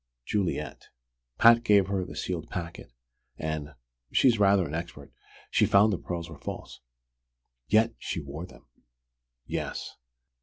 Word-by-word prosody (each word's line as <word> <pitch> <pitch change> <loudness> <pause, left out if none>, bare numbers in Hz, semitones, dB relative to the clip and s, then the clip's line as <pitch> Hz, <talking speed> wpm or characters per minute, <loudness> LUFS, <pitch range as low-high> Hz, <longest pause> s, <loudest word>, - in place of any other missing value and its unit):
"Juliet. 100 -4 -2 0.5
Pat 115 0 +7
gave 105 -4 +5
her 95 -1 -1
the 90 - -9
sealed 85 -4 -4
packet, 85 -8 -6 0.5
and 75 -2 -4 0.4
she's 120 -5 +4
rather 100 -2 +4
an 70 - -8
expert! 80 -4 -6 0.4
she - - +4
found 105 +2 +5
the 90 - -2
pearls 85 -2 -5
were 80 -3 -11
false." - - -7 0.9
"Yet 110 - +4
she - - -3
wore 75 +4 -7
them." - - -17 0.8
"Yes." - - -4
90 Hz, 130 wpm, -28 LUFS, 80-100 Hz, 0.9 s, Pat